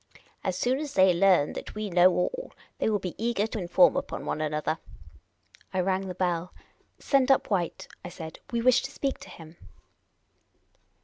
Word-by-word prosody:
As 185 -1 -1
soon 255 +5 +1
as 295 -2 -6
they 185 -1 +6
learn 180 -4 +3
that - - -8
we 215 -2 -4
know 175 +1 +6
all, - - -2 0.3
they - - +1
will 210 - +2
be 185 -3 -5
eager 230 -3 +1
to 225 0 -5
inform 190 +10 +4
upon 275 - -4
one 155 - -2
another." 155 +1 -1 1.0
I - - 0
raifg 190 +1 0
the 180 - -6
bell. 175 -1 -2 0.2
" - - -38
Send 275 -2 +2
up 270 -4 +3
White," 175 -4 -1 0.2
I 180 - -6
said. 160 -2 -9
" - - -21
We 235 -1 -1
wish 250 0 +5
to 270 - -5
speak 275 -1 -3
to - - -12
him." 160 0 -13
190 Hz, 190 wpm, -27 LUFS, 175-245 Hz, 1.0 s, they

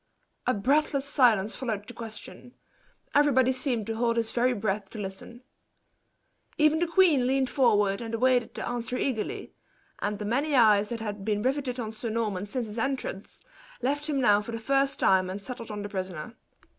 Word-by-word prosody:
A 255 - +4
breathless 275 +5 +1
silence 235 -8 +3
followed 220 -6 -3
the 245 - -8
question 230 +2 -9 0.6
everybody 265 -3 +4
seemed 255 -4 -1
to 225 +1 -4
hold 235 0 +1
his 230 -1 0
very 250 +1 +2
breath 205 -2 -2
to 225 - -10
listen. 205 +5 -7 1.1
Even 305 +1 +4
the 345 - +1
queen 325 -7 +4
leaned 265 0 +1
forward 210 -7 +3
and 230 -1 -4
awaited 250 0 +2
the - - -4
answer 240 0 -3
eagerly, 245 -6 -3 0.5
and 205 0 -2
the 210 - -5
many 275 +7 0
eyes 210 -4 +5
that 235 -2 -4
had 205 -2 -5
been 210 0 -1
riveted 260 -1 -1
on 220 -2 -3
Sir 225 +1 -5
Norman 210 -3 -2
since 245 +3 -3
his 215 +1 -6
entrance, 255 -6 -4 0.4
left 290 +4 -1
him 285 -2 0
now 210 -5 +4
for 215 - -7
the - - -2
first 275 +4 +1
time 185 -1 +3
and 190 +2 -4
settled 230 +1 -7
on 210 -1 -5
the 205 - -5
prisoner. 185 -1 -5
235 Hz, 180 wpm, -27 LUFS, 210-260 Hz, 1.1 s, eyes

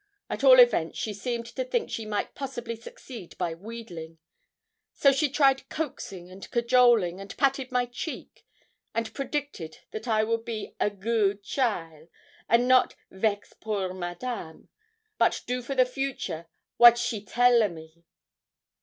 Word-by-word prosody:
At - - -4
all - - +9
events, 485 -1 +4
she 215 - -3
seemed 235 +3 -3
to 370 - -4
think - - -2
she 220 -1 -4
might 210 -1 -2
possibly 240 -4 -5
succeed 225 -3 -11
by 175 -2 -1
wheedling; 175 -4 -9 0.8
so 275 - +5
she 285 +2 +1
tried 270 -1 +2
coaxing 200 - -5
and 190 +1 -10
cajoling, 235 -6 +3
and 195 0 -9
patted 270 -1 +1
my 250 -1 +2
cheek, 245 +7 -7 0.5
and 230 -1 -2
predicted 275 - -4
that 215 - -6
I 215 -2 +3
would 230 +1 -1
be 225 -3 -5
'a - - +2
good 205 0 0
cheaile,' 170 - -2 0.4
and 235 +2 +4
not 255 0 +4 0.2
'vex 205 +1 -1
poor 200 -4 -3
Madame,' 175 0 -6 0.5
but - - +2
do 250 0 -2
for 270 +3 -5
the 255 -1 +5
future 250 - -4 0.3
'wat 240 0 +9
she 240 -3 -2
tell 245 +1 +4
a 210 - +2
me.' 160 0 -13
230 Hz, 150 wpm, -27 LUFS, 195-255 Hz, 0.8 s, all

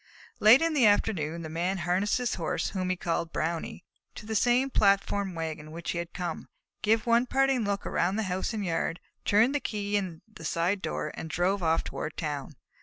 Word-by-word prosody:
Late 230 +8 +7
in 330 -1 +1
the 260 -7 +5
afternoon, 170 -6 +1
the - - -5
Man 175 +4 -1
harnessed 180 +5 +1
his 250 -1 -1
Horse, 170 -1 -1
whom 185 -2 -2
he 185 - +1
called 170 -2 -2
Brownie, 165 +2 -3 0.3
to - - -9
the 220 - -4
same 245 +5 +3
platform 200 -2 +2
wagon 160 -2 -4
in - - -11
which 170 +1 -4
he 170 - -2
had 170 0 -5
come, 175 -3 -5 0.3
gave 220 +2 +2
one 235 +1 +3
parting 270 -2 +2
look 200 0 -2
all - - -4
around 185 +3 +1
the 220 - 0
house 185 +1 -2
and 215 -3 -3
yard, 165 0 -1 0.3
turned 220 +6 +4
the 290 - +1
key 205 -4 -3
in 185 -5 -2
the 215 -6 -13
side 175 +5 0
door, 150 - -3
and 160 - -7
drove 185 +4 +1
off 165 -1 +2
toward 155 - -5
town. 150 -2 -4
190 Hz, 210 wpm, -28 LUFS, 165-215 Hz, 0.3 s, Late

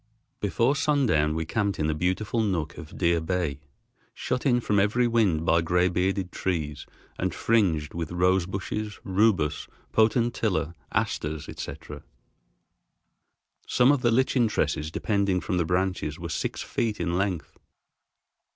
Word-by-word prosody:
Before 115 +7 +1
sundown 130 - +2
we 80 0 -2
camped 100 +2 -1
in 75 - 0
a 80 - +1
beautiful 95 +8 0
nook 85 -7 -1
of 80 -2 -10
Deer 85 -2 +2
Bay, 80 -4 -2 0.6
shut 125 +3 -2
in 120 -2 +4
from 105 -4 +1
every 105 +5 +2
wind 100 -9 +2
by 85 0 +4
gray 90 +2 +2
bearded 90 +1 -1
trees 75 -6 -3 0.3
and - - -1
fringed 85 -10 +1
with 85 -1 -4
rose 90 0 +2
bushes, 105 +2 -4
rubus, 95 -6 +1 0.3
potentilla, 110 -7 +1 0.2
asters, 75 0 -2
etc. 75 0 -7 1.7
Some 125 +3 +4
of 145 -3 +1
the 120 - +3
lichen 125 0 +3
tresses 80 -7 -1
depending 100 +1 0
from 90 - -2
the 85 - +1
branches 90 -3 -1
were - - -6
six - - -3
feet 110 -2 -2
in 85 0 -1
length. 95 -3 -2
95 Hz, 140 wpm, -26 LUFS, 80-110 Hz, 1.7 s, in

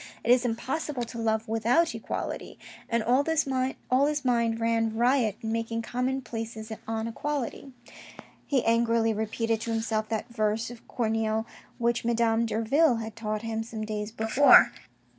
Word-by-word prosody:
It 235 - +2
is 250 0 +5
impossible 255 +3 -2
to 235 0 -7
love 220 0 0
without 230 +9 +2
equality... - - -5 0.3
and 235 -1 +1
all 255 +5 +3
his 320 0 +1 0.8
mind 235 -2 +1
ran 225 -1 0
riot 240 -3 +2
in 220 - -3
making 230 0 -2
common 255 +3 -2
places 225 -2 -6 0.2
on 225 0 -2
equality. 275 +2 -4 0.8
He 270 -4 +1
angrily 230 -1 +2
repeated 220 +1 -1
to 230 - -3
himself 225 -1 -1
that 220 -1 -2
verse 220 0 -1
of 240 - -13
Corneille 220 -1 -1 0.3
which 235 0 0
Madame 230 -1 +2
Derville 235 +6 +3
had 225 -1 -5
taught 215 -1 -3
him 225 -1 -2
some 225 -1 -5
days 210 0 -4
before. 225 +6 +6
230 Hz, 145 wpm, -27 LUFS, 220-240 Hz, 0.8 s, before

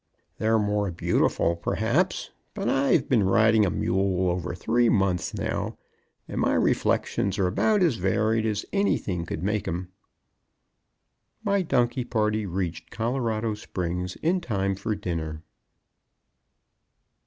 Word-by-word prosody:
"They're 110 +1 +3
more 105 -1 0
beautiful 85 0 +1
perhaps, 120 - 0 0.2
but 200 -2 -2
I've 135 +1 +2
been 120 -5 +3
riding 110 +2 +4
a - - +2
mule 95 -1 +1
over 90 -1 -3
three 115 +5 +2
months 95 -5 +1
now, - - -3 0.5
and - - -3
my - - +2
reflections 100 +1 +1
are 95 - +2
about 205 - +2
as 155 -10 +2
varied 110 +4 +1
as 105 -1 -2
anything 95 - 0
could 80 - -4
make 105 +1 -1
'em." 90 +2 -3 1.5
My 200 -2 +2
donkey 125 -6 +1
party 110 -3 0
reached 85 -3 -3
Colorado 115 -2 -1
Springs 90 -3 -4
in 180 +3 +2
time 100 - -1
for 100 +3 -3
dinner. 80 -5 -4
105 Hz, 125 wpm, -26 LUFS, 90-115 Hz, 1.5 s, riding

